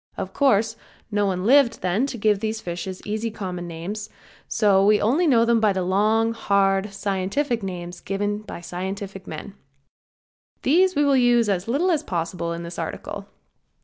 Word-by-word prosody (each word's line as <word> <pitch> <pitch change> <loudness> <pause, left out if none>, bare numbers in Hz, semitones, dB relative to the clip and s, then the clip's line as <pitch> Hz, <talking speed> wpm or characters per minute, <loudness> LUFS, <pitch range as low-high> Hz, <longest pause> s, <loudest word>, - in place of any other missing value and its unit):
Of - - -5
course, 225 -5 +2 0.3
no 205 -1 +1
one 185 -1 -2
lived 265 0 +4
then 195 +9 +1
to 255 - -5
give 210 -2 +2
fishes 190 -4 -4
easy 215 +2 -2
common 180 -5 -5
names, 185 +6 -5
and - - -31 0.3
so 200 -3 +3
we 210 +1 +5
only 290 +11 +2
know 235 -5 +4
them 235 -1 +3
by 215 -2 +3
the 190 -1 -1
long, 215 +5 +2
hard 200 -2 +1
scientific 200 +6 -1
names 180 -2 -6
given 205 +2 -2
by 210 -4 -9
scientific 190 +2 -6
men. 200 - -7 1.1
These 365 +6 +4
we 290 0 +3
will 280 -1 +4
use 240 -3 +4
as 190 0 -1
little 305 +10 +1
as 315 -4 +1
possible 170 - -3
in 170 0 -4
this 170 0 -7
article. - - -5
205 Hz, 170 wpm, -23 LUFS, 190-230 Hz, 1.1 s, we